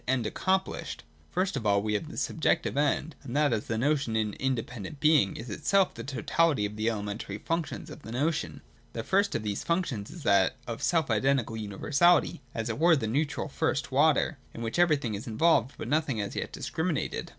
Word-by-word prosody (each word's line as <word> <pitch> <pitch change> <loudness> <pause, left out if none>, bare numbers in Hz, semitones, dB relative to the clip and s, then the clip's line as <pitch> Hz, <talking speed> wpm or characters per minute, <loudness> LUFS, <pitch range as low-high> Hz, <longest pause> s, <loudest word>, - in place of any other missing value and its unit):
End 130 -3 +1
accomplished. 145 - -1 0.3
First 185 +2 0
of - - -3
all 100 -1 +2
we 105 0 -1
have 105 - -2
the - - -9
Subjective - - 0
End; 145 +1 0
and 130 -2 -7
that, 150 -3 +3
as 110 - -1
the 115 - -1
notion 140 -2 +1
in 110 -2 0
independent 125 +1 -3
being, 150 -10 +4
is 115 - -7
itself 195 - +2
the - - -7
totality 145 -2 +1
of 105 +1 -5
the 110 +2 0
elementary 105 -2 -4
functions 165 +8 -3
of - - -10
the 110 - -9
notion. 145 +6 -1 0.3
The 115 - -4
first 200 - +2
of - - -1
these 105 -1 -2
functions 170 - -1
is 170 - -10
that 100 -5 +3
of 115 -1 -5
self 160 -7 +1
identical 120 0 +1
universality, 140 - +2
as 115 0 -2
it 115 +2 -3
were 170 +1 +6
the 130 -7 -1
neutral 145 +9 -1
first 145 -3 -1
water, 145 +1 +3 0.2
in 115 - -5
which 115 +8 -2
everything 150 -9 +3
is 100 +3 -5
involved, 130 +2 +2
but - - -5
nothing 145 -4 0
as 100 -1 -3
yet - - -3
discriminated. 160 -1 -2
130 Hz, 195 wpm, -28 LUFS, 110-155 Hz, 0.3 s, were